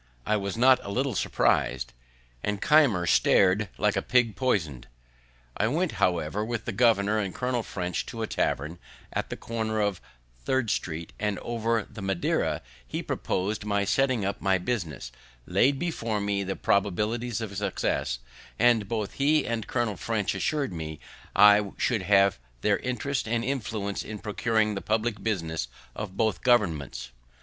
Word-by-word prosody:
I 110 - +2
was 100 0 -2
not 130 +2 +6
a - - -7
little 130 +5 0
surprised, 65 -8 +1 0.5
and 105 -1 -1
Keimer 130 - +4
star'd 95 +5 +4
like - - +2
a - - +1
pig 120 -4 +2
poison'd. 80 - -1 0.7
I 105 - +1
went, 165 +8 0
however, 90 +3 +1
with 115 0 -3
the - - -2
governor 110 -1 +3
and 100 -4 -3
Colonel 125 -1 -1
French 90 -5 -3
to 115 -2 -4
a - - +1
tavern, 80 -4 -1 0.3
at - - -2
the - - -5
corner 110 -1 -2
of 100 -3 0 0.4
Third 130 - +1
street, 80 -1 -3
and 105 -2 -1
over 115 0 -1
the 110 -1 -10
Madeira 95 -2 0 0.2
he - - -4
propos'd 100 +3 -2
my 100 -1 0
setting 130 -2 +2
up 100 - -3
my 95 -1 +3
business, 85 - -3 0.3
laid 125 +10 +3
before 115 -10 -2
me 100 -1 0
the 95 0 -3
probabilities 105 +4 0
of 110 -3 -5
success, 70 -9 -1 0.4
and 120 -3 +4
both 110 -3 -2
he 150 +1 +2
and 115 -2 -2
Colonel 120 -6 -1
French 110 -1 -1
assur'd 145 - -1
me 80 -2 -6 0.4
I 105 0 +6
should 115 -5 +1
have 100 -3 +4 0.2
their - - +2
interest 130 +1 -2
and 115 +1 0
influence 110 -6 -2
in 110 - -6
procuring 110 +1 0
the 100 - -4
public 110 -1 -1
business 80 - -2 0.3
of 100 -3 -6
both 110 -1 +1
governments. 80 - +1
105 Hz, 160 wpm, -27 LUFS, 95-120 Hz, 0.7 s, not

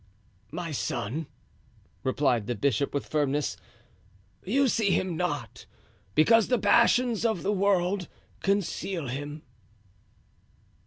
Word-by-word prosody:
"My 165 +1 -4
son," 135 +2 -3 0.8
replied 130 -5 +1
the 120 - -1
bishop, 140 +3 0
with 140 - -2
firmness, 145 -1 0 0.9
"you 270 +7 +2
see 220 -4 +1
Him 185 -2 +1
not, 145 -9 -3 0.5
because 225 +7 +5
the 250 - +2
passions 235 +2 +3
of 220 -7 0
the 205 - +1
world 190 -2 +1 0.3
conceal 195 -5 -1
Him." 145 +4 -5
175 Hz, 105 wpm, -27 LUFS, 140-205 Hz, 0.9 s, because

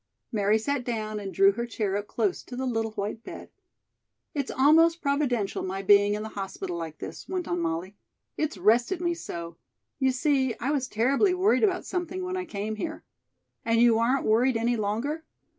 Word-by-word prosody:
Mary 210 -1 +2
sat 270 +4 -1
down 215 -3 -3
and 195 -2 -5
drew 195 +1 +5
her 235 +4 -4
chair 210 -4 -2
up 205 0 -3
close 395 -3 -1
to 250 - -9
the 260 +1 -2
little 225 -3 -1
white 210 +2 -4
bed. - - -9 0.8
"It's 280 -3 -2
almost 325 +5 +5
providential 280 -8 0
my 190 +1 -4
being 205 +1 +5
in 210 - -4
the 220 - -5
hospital 195 -3 -5
like 165 -2 -5
this," - - -8
went 370 -3 -2
on 175 - -1
Molly, 170 +4 -3 0.4
"it's 310 -9 -2
rested 235 - +3
me 345 -1 0
so. 170 - -7 0.4
You 265 -1 +3
see, 260 -1 +1
I 270 - -1
was 270 -4 0
terribly 275 - +2
worried 385 +5 +3
about 380 -4 +2
something 360 0 -3
when 365 0 -3
I 370 0 -3
came 215 - -4
here." 315 +6 -5 0.6
"And 230 0 +2
you 235 -1 +5
aren't 255 +4 +1
worried 235 +3 +3
any 235 +2 +1
longer?" 230 +9 -2
235 Hz, 190 wpm, -27 LUFS, 205-290 Hz, 0.8 s, drew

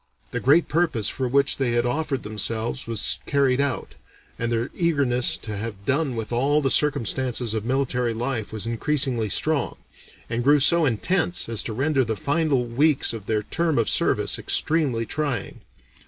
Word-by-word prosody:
The - - -2
great 150 +6 +4
purpose 150 -11 +1
for 130 -2 -3
which 140 +2 +2
they 130 -3 0
had 120 0 +1
offered 135 +1 -2
themselves 110 +4 -3
was 115 -3 +1
carried 140 -2 +2
out, 140 -2 -3 0.5
and 115 0 -1
their 115 +1 -1
eagerness 140 -8 +1
to 110 -2 -6
have 100 -1 -6
done 140 -2 0
with 115 0 -5
all 140 +5 +2
the 135 -3 0
circumstances 125 -4 +1
of 110 -1 -3
military 125 -2 0
life 120 -2 -3
was 110 -1 -5
increasingly 120 -1 -1
strong, 150 +4 0 0.5
and 120 +1 -2
grew 145 +3 +5
so 170 +4 +5
intense 175 - 0
as 115 -2 +1
to 110 - -4
render 135 +3 +1
the 110 -2 -2
final 145 - 0
weeks 135 +3 +2
of 110 -3 -8
their 105 -1 0
term 165 +5 -1
of 115 - +2
service - - +1
extremely 140 -8 +1
trying. 145 +1 -3
125 Hz, 170 wpm, -24 LUFS, 115-145 Hz, 0.5 s, grew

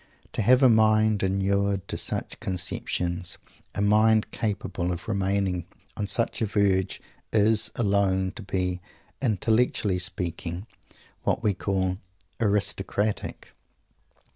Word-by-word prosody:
To - - -2
have 125 +5 +5
a - - +9
mind 110 -2 +4
inured 100 0 +1
to - - -2
such - - -3
conceptions, 90 -1 -2 0.4
a 100 - 0
mind 110 +1 +4
capable 100 -4 -2
of 90 -1 -5
remaining 95 -3 0 0.3
on 105 - -2
such 115 +4 -1
a 110 - +2
verge, 100 -2 +1 0.3
is, 110 0 +3
alone, 100 -3 +1
to 110 - -10
be, 90 -2 -2 0.4
intellectually 110 -4 +1
speaking, 90 0 -4 0.6
what 120 - 0
we 105 -2 +3
call 95 -1 -1 0.4
"aristocratic." 100 -1 0
100 Hz, 115 wpm, -26 LUFS, 95-110 Hz, 0.6 s, a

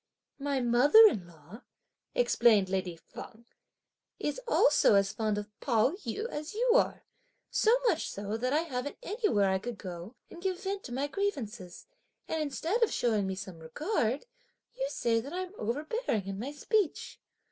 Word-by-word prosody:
"My 280 -1 -1
mother 250 - +7
in 190 - -1
law," 170 - -14 0.5
explained 230 - +4
lady 185 -2 -2
Feng, 220 +7 -12 0.7
"is 295 +12 -3
also 295 - +5
as 195 0 +2
fond 215 -1 -1
of 210 0 -4
Pao 235 -1 +2
yü 370 - -4
as 305 -1 -6
you 485 +2 +2
are, - - +2 0.5
so 455 +3 +4
much 345 -8 +1
so 205 +1 -4
that 250 +3 -1
I 300 +3 +3
haven't 285 -3 -4
anywhere 400 - +1
I 190 - +1
could 235 +2 -6
go 180 +4 -8 0.2
and 345 - -10
give 375 0 -2
vent 390 0 -3
to - - -8
my 265 +3 -1
grievances; 245 - -4 0.4
and 320 - -1
instead 325 - -1
of 460 - +3
(showing 215 -5 +1
me 190 - -2
some 185 -3 -8
regard) 255 - -1 0.5
you - - -2
say 230 - +1
that 275 +7 -7
I'm 370 +1 -4
overbearing 285 - -2
in 195 0 -5
my 260 +6 -4
speech!" 370 +4 -1
250 Hz, 165 wpm, -30 LUFS, -, 0.7 s, mother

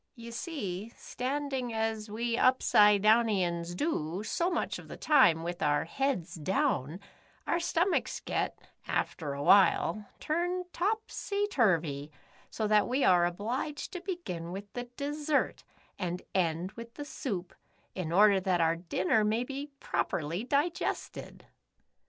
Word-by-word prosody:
You 235 -1 -9
see, 225 - -4
standing 265 -1 -3
as 220 -1 -2
we 230 +2 -1
Upsidedownians 210 -7 +4
do, 180 - -2
so 340 +10 0
much 345 - -2
of - - -12
the - - -8
time, 255 - +4
with 175 +1 -4
our 145 0 +2
heads 255 -2 -1
down, 175 - -1 0.5
our 340 - +1
stom 345 +2 +1
achs - - -1
get, - - -1 0.3
after 150 -4 -2
a 140 - -4
while, 200 +4 +4 0.2
turned 355 +3 -2
topsy 410 +1 -1
turvy, 160 - +1 0.4
so 220 - -2
that 210 0 +4
we 260 +3 +1
are 175 -1 +5
obliged 245 - -4
to 360 - -5
begin 340 - -5
with 200 +2 -8
the 245 -1 -4
dessert, 295 +1 -1 0.4
and 180 -1 -3
end 175 0 0
with 230 +1 -10
the 290 - -6
soup, 190 -11 -4 0.4
in 180 -4 -4
order 200 +2 +6
that 185 -2 +1
our 165 0 +2
dinner 180 +4 +1
may 220 +3 +1
be 275 +3 -5
properly 170 - -2
digested." 295 +6 -2
215 Hz, 135 wpm, -30 LUFS, 175-285 Hz, 0.5 s, order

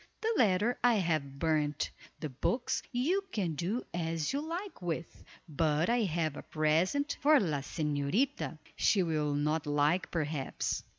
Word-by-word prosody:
The 450 +1 +1
letter 215 - +3
I 245 -1 +5
have 155 -8 0
burned. 150 -1 0 0.3
The 155 - -3
books 235 - -1
you 320 +11 +1
can 185 -7 -1
do 185 - -2
as 165 - -1
you 280 - 0
like 345 - -5
with, 170 -1 -4 0.2
but 155 +4 +1
I 240 0 +3
have 160 -4 -1
a - - -6
present 165 - +1
for 300 0 +6
la 155 -8 0
señorita, 150 - -1 0.2
she 195 -3 +3
will 155 -3 0
not 150 +1 0
like, 145 +5 +2
perhaps." 150 -4 -2
165 Hz, 145 wpm, -32 LUFS, 150-235 Hz, 0.3 s, for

